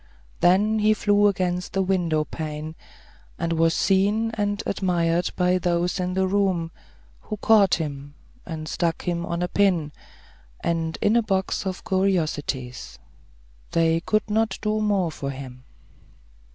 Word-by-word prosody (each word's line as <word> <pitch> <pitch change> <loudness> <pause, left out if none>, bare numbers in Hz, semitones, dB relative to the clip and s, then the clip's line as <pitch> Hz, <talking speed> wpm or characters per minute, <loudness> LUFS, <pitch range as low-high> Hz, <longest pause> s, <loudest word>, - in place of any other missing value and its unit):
Then 205 +5 +3
he 215 +1 +4
flew 205 -1 +3
against 180 -2 -1
the 195 - +1
window 175 -5 +1
pane, 155 0 -6 0.6
and 170 0 -1
was 165 0 +2
seen 205 +4 +2
and 205 -1 -1
admired 175 -2 0
by 180 0 +2
those 175 +1 0
in 180 0 -2
the 190 0 +2
room, 185 -4 0 0.5
who 215 - -6
caught 205 -2 +4
him, 145 -3 -6 0.3
and 160 -2 -6
stuck 165 0 -1
him 170 -1 -2
on 170 +1 -2
a - - 0
pin, 180 -7 +1 0.7
in 165 -1 -1 0.2
a 235 - +5
box 195 -2 -1
of 185 -1 -5
curiosities. 150 - -1 0.8
They 165 0 +3
could 215 +5 0
not 220 +1 0
do 215 0 0
more 200 -5 +1
for 140 -2 -5
him. 130 -2 -8
180 Hz, 140 wpm, -24 LUFS, 165-200 Hz, 0.8 s, a